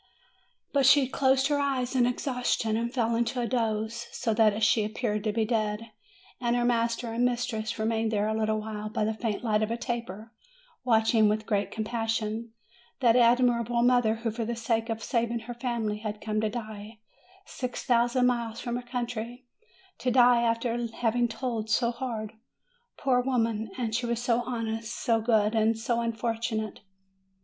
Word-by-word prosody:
But 275 -2 +4
she 275 -1 +6
closed 265 0 +2
her 290 -1 +1
eyes 265 -2 -1
in 245 -2 +4
exhaustion, 245 -3 -1
and 235 +1 -1
fell 235 -3 0
into 235 +2 0
a 240 - 0
doze, 230 -1 -1
so 230 -3 -1
that 215 -1 +3
she 215 0 +4
appeared 215 -1 -2
to 215 - +2
be 220 +1 0
dead. 215 0 -1 0.5
And 240 -1 +1
her 240 0 +1
master 235 -1 0
and 235 +2 0
mistress 235 -3 -1
remained 225 0 0
there 210 -1 +1
a 220 - 0
little 220 0 0
while, 215 0 -5
by 215 - -1
the 220 - 0
faint 220 0 -3
light 215 -2 +1
of 215 - 0
a 230 - -2
taper, 235 -2 -5 0.5
watching 225 -2 +4
with 215 +1 -1
great 205 -3 0
com 220 - -3
passion 225 0 -2 0.5
that 240 -3 +4
admirable 240 -1 +3
mother, 245 -3 +4
who 225 0 -3
for 230 +2 -3
the 235 +1 -3
sake 230 0 -1
of 225 0 -3
saving 235 -2 -1
her 240 +2 -7
family, 235 -4 -2
had 210 -1 -5
come 215 0 -2
to 220 - 0
die 215 -1 -7 0.5
six 250 -1 -5
thousand 245 +1 +3
miles 235 -2 0
from 240 0 -3
her - - -4
country, 240 0 -4 0.5
to 250 - 0
die 245 -1 +5
after 230 0 0 0.2
having 240 +1 +1
toiled 230 -2 -4
so 235 +2 +2
hard, 230 -3 -5 0.6
poor 255 -3 +2
woman! 230 -4 0
and 230 -3 -2
she 240 +2 0
was 235 -1 -1
so 240 0 +1
honest, 230 -1 -3
so 225 -1 +1
good, 220 0 +2
so 230 +1 -1
un 230 0 0
fortunate. 225 -1 -3
230 Hz, 175 wpm, -28 LUFS, 220-245 Hz, 0.6 s, she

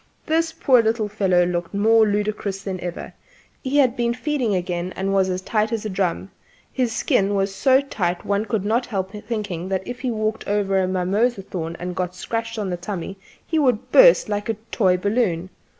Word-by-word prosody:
The 325 +1 +1
poor 255 -3 +5
little 220 -1 0
fellow 190 -4 +2
looked 175 +1 -3
more 220 +2 +4
ludicrous 205 -1 -2
than 190 -2 -4
ever: 175 -1 -6 0.5
he 275 +1 -1
had 260 -4 +4
been 235 -1 0
feeding 255 -6 -1
again 180 0 -3
and 195 +1 -1
was 190 -1 +2
as 185 0 -3
tight 215 +1 0
as 225 -2 -2
a - - -2
drum; 190 0 -2 0.4
his 250 -3 0
skin 200 -2 +1
was 195 0 0
so 265 +6 +4
tight 180 -10 -2
one 205 +1 0
could 210 -2 -2
not 235 +4 +1
help 190 -4 -3
thinking 210 -5 -4
that 190 -1 -2
if 245 0 -6
he 255 - -2
walked 215 -1 -2
over 200 -1 +1
a 185 - +1
mimosa 195 +4 0
thorn 170 -3 -5
and 180 0 -5
got 180 -1 -2
a - - -16
scratch 230 +3 -4
on 200 -3 -2
the 175 - -2
tummy 190 0 -5 0.3
he 320 - 0
would 250 -7 +1
burst - - +7
like 205 +1 -3
a 225 - +1 0.2
toy 185 -5 +3
balloon. 190 -3 0
205 Hz, 200 wpm, -22 LUFS, 185-230 Hz, 0.5 s, burst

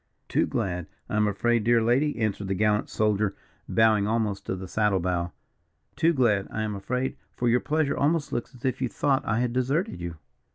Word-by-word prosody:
"Too - - +1
glad, 90 -2 -2 0.2
I - - -2
am 105 0 +3
afraid, 115 +3 +1
dear 120 +1 +4
lady," 125 +6 +2
answered 105 -3 -1
the 95 - 0
gallant 105 +1 +1
soldier, 105 -2 +1 0.3
bowing 110 -2 +4
almost 110 -3 -1
to - - -1
the 95 0 -7
saddle 105 0 +1
bow, 85 -1 -1 0.6
"too 165 - +3
glad, 115 -10 +2
I 110 - -3
am 105 -1 -2
afraid; 125 +6 -2 0.2
for 120 - -1
your 120 +1 +4
pleasure 155 0 0
almost 150 +1 +1
looks 120 +2 -3
as 125 - -10
if 130 0 -1
you 130 - 0
thought 135 +3 +1
I 110 +1 +1
had 125 -1 0
deserted 135 - 0
you." 85 -1 -5
110 Hz, 200 wpm, -26 LUFS, 100-125 Hz, 0.6 s, dear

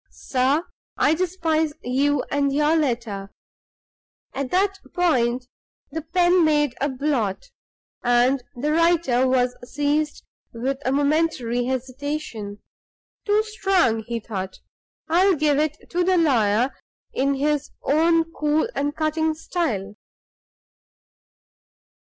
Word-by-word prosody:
"Sir 270 +6 0 0.3
I 300 - +4
despise 325 -3 0
you 275 +3 +1
and 280 -1 +1
your 300 +3 +2
letter. 235 -9 -2 0.5
" - - -56
At 275 -1 -3
that 390 +3 +1 0.2
point 255 -9 +1 0.5
the 320 +3 -3
pen 350 +2 +3
made 295 -4 +2
a 285 - +1
blot, 265 - -2 0.5
and 245 +2 +3
the 290 +5 -1
writer 330 -7 +3
was 250 -1 +2
seized 290 +3 -1 0.3
with 260 +4 -2
a 260 - +1
momentary 280 -4 +1
hesitation. 260 -4 -4 0.6
"Too 420 +1 +3
strong," 385 - +1
he 235 -1 -2
thought; 190 -4 -6 0.5
"I'll 365 +4 +4
give 295 -1 +2
it 305 0 0
to 355 0 +1
the 370 +1 +3
lawyer 245 -6 +3 0.4
in 275 +1 +1
his 295 +1 0
own 330 +3 +3
cool 300 +5 +1
and 290 +1 -2
cutting 315 0 0
style." 240 - -2
290 Hz, 115 wpm, -23 LUFS, 250-320 Hz, 0.6 s, I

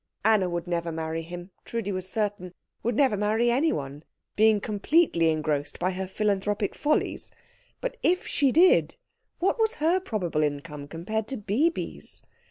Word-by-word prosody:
Anna 215 -4 +4
would 175 0 -3
never 170 -1 -2
marry 160 0 -3
him, 175 +3 -8
Trudi 230 -4 -3
was 185 -1 -3
certain 205 -4 -2 0.3
would 235 0 -1
never 265 -4 +3
marry 215 +4 +2
anyone, 150 - 0 0.3
being 215 0 +5
completely 205 - +2
engrossed 150 -2 -1
by 185 +2 0
her 190 +1 -4
philanthropic 205 0 0
follies; 300 +1 0 0.5
but - - -3
if 360 +2 +2
she 280 -2 +2
did, 345 +7 +5 0.4
what 390 +7 +1
was 445 +1 +2
her 330 +5 +2
probable 185 - -2
income 145 0 -3
compared 210 +8 -3
to 265 - -3
Bibi's? 240 - -1
205 Hz, 150 wpm, -27 LUFS, 170-240 Hz, 0.5 s, being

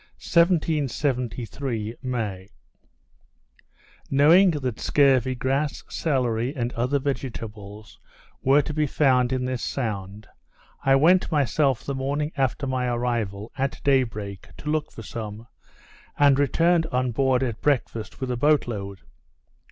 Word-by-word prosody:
_ - - -28
1773 135 - 0
May 110 -7 -4 1.6
Knowing 160 +8 +6
that 130 -8 -3
scurvy 130 -3 +3
grass, 135 +4 -1
celery, 125 -3 -1
and 120 -2 -2
other 125 +4 0
vegetables, 110 -7 -6 0.4
were 140 +2 +4
to 150 - -5
be 150 0 +1
found 130 -4 +2
in 130 -1 -1
this 130 -1 -3
sound, 105 -4 -4 0.6
I 135 0 +4
went 175 +7 +4
myself 140 -3 +1
the 140 - -3
morning 140 +3 -2
after 135 0 0
my 130 -1 -1
arrival, 120 -4 -2
at 135 +2 -1
day 135 -2 +4
break, 105 -5 -6
to 150 - -4
look 155 -1 -1
for 115 - -10
some, 110 0 -7 0.7
and 140 -1 +5
returned 165 +4 +2
on 125 -3 -1
board 130 +1 +2
at 115 -4 -3
breakfast 120 -6 -1
with 130 -1 -3
a 125 - -2
boat 150 +2 +3
load. 100 -4 -6
130 Hz, 130 wpm, -24 LUFS, 115-145 Hz, 1.6 s, Knowing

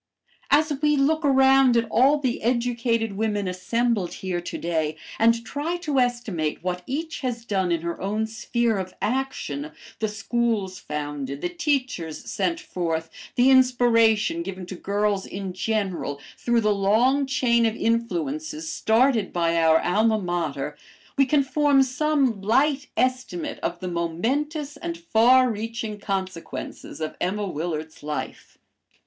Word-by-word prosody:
As 305 +1 +4
we 300 -1 +3
look 310 +4 +2
around 265 -2 +5
at 230 - +1
all 275 +5 +5
the 260 -4 -2
educated 235 -2 0
women 205 -2 -1
assembled 195 +2 0
here 180 -2 -3
to 175 - -5
day 160 -2 -1 0.2
and 230 +1 +3
try 305 +7 -2
to 300 -6 0
estimate 230 -12 -1
what 180 0 -2
each 320 +4 -3
has 240 -3 -3
done 190 -5 0
in 170 -1 +1
her 170 0 -4
own 210 +3 -1
sphere 225 0 -1
of 185 -1 -6
action, 210 - -2 0.3
the 220 - 0
schools 210 -3 -1
founded, 145 -2 -5
the - - -1
teachers 265 - -2
sent 335 -1 0
forth, 165 - -3 0.2
the 250 +2 +5
inspiration 230 -7 +4
given 185 +1 -6
to 185 - -7
girls 200 +1 -1
in 195 -1 -5
general, 185 -6 -2 0.2
through 235 -1 +1
the 210 -1 +3
long 235 +8 +2
chain 235 -3 +3
of 220 - -2
influences 160 -10 -2
started 225 -2 +2
by 170 -1 +1
our 160 -1 +5
alma 220 +5 +2
mater, 160 -7 -2 0.4
we 275 -1 +3
can 285 +1 +3
form 280 0 +3
some 265 -4 +1
light 275 +7 +2
estimate 255 +6 -1
of - - -3
the 185 - -4
momentous 270 - -2
and 335 +2 -5
far 255 -5 +4
reaching 220 0 -4
consequences 190 -5 -5
of 155 - -3
Emma 205 +3 -1
Willard's 160 -2 -4
life. 150 0 -6
220 Hz, 140 wpm, -24 LUFS, 180-260 Hz, 0.4 s, around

